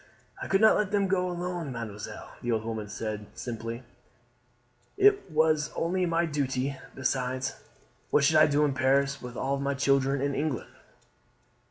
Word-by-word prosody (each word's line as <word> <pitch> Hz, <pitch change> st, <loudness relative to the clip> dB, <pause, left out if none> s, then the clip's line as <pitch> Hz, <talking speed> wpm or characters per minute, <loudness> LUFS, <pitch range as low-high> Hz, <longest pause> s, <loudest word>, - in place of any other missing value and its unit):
"I -, -, -4 dB
could 195 Hz, +1 st, +2 dB
not 220 Hz, -, +7 dB
let 210 Hz, -3 st, 0 dB
them 200 Hz, -1 st, +1 dB
go 185 Hz, -1 st, +1 dB
alone, 175 Hz, -4 st, -3 dB
mademoiselle," 110 Hz, -4 st, -7 dB
the 120 Hz, -, -1 dB
old 110 Hz, -1 st, -1 dB
woman 110 Hz, -2 st, -4 dB
said 105 Hz, -1 st, -4 dB
simply; 115 Hz, 0 st, -5 dB, 1.1 s
"it 405 Hz, -, +4 dB
was 155 Hz, -1 st, +2 dB
only 180 Hz, +2 st, 0 dB
my 170 Hz, 0 st, +2 dB
duty. 140 Hz, -3 st, -1 dB, 0.2 s
Besides, 130 Hz, 0 st, -1 dB, 0.6 s
what 145 Hz, -, +3 dB
should 155 Hz, +2 st, +5 dB
I 155 Hz, -, +7 dB
do 150 Hz, +1 st, +3 dB
in 140 Hz, -, 0 dB
Paris 135 Hz, +1 st, +2 dB
with 125 Hz, -1 st, -8 dB
all 135 Hz, +1 st, -1 dB
my 140 Hz, 0 st, -1 dB
children 135 Hz, 0 st, +2 dB
in 140 Hz, +1 st, 0 dB
England?" 145 Hz, -4 st, -2 dB
140 Hz, 160 wpm, -28 LUFS, 125-165 Hz, 1.1 s, not